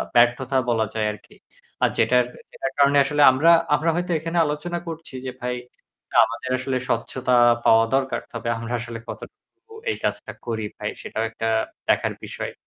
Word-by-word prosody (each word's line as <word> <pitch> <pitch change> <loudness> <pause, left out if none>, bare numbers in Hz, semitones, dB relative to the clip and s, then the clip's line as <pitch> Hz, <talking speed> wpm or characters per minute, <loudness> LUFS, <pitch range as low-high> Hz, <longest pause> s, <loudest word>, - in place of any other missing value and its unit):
ব্যর্থতা 125 +2 +3
বলা 110 -2 +2
যায় 110 -1 0
আরকি। - - -16 0.5
আর - - +5
যেটার, 125 -1 +4 0.3
যেটার 135 - -4
কারণে 140 0 +5
আসলে 145 +1 0
আমরা, 150 +6 +4 0.2
আমরা 165 +3 0
হয়তো 175 +1 -2
এখানে 165 +2 -3
আলোচনা 155 +4 -3
করছি 160 -4 -8
যে - - -3
ভাই 125 0 -2 0.7
আমাদের 130 - -6
আসলে 130 0 -1
স্বচ্ছতা 125 +2 -1 0.3
পাওয়া 115 0 +6
দরকার। 135 0 0
তবে 115 0 -4
আমরা 115 +1 -5
আসলে 115 -1 -6
কতটুকু 445 - -12 0.2
এই - - -4
কাজটা - - -2 0.2
করি 110 -2 -2
ভাই - - -3
সেটাও 110 - -3
একটা 115 0 -3 0.4
দেখার - - +2
বিষয়। - - -6
130 Hz, 160 wpm, -23 LUFS, 115-150 Hz, 0.7 s, পাওয়া